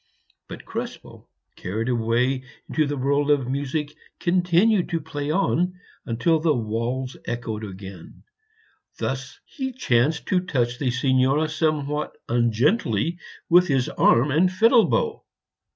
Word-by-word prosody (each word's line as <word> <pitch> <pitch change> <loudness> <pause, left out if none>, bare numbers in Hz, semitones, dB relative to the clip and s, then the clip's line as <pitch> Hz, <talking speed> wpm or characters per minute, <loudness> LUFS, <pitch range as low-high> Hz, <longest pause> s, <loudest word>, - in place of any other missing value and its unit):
But - - -9
Krespel, - - -7 0.3
carried 110 +6 -4
away 125 +2 +1 0.2
into 155 -2 0
the 145 0 -3
world 140 +2 +1
of 140 -4 +2
music; 145 +3 -2 0.3
continued 180 +3 +2
to 165 - -1
play 145 -1 -5
on 180 +1 0 0.3
until 155 +8 +1
the 155 -1 +2
walls 120 +3 -3
echoed 115 -2 -4
again; 95 -3 -10 0.7
thus - - -4
he 265 -3 -5
chanced 150 - +1
to 185 - +3
touch 125 -9 -1
the 135 - 0
Signora 130 +4 +2
somewhat 150 -1 -1
ungently 120 - +1 0.3
with 180 +2 +5
his 135 -3 +1
arm 125 +5 +3
and 170 +6 +3
the - - -10
fiddle 230 +4 +5
bow. 460 -2 0
145 Hz, 130 wpm, -24 LUFS, 120-170 Hz, 0.7 s, with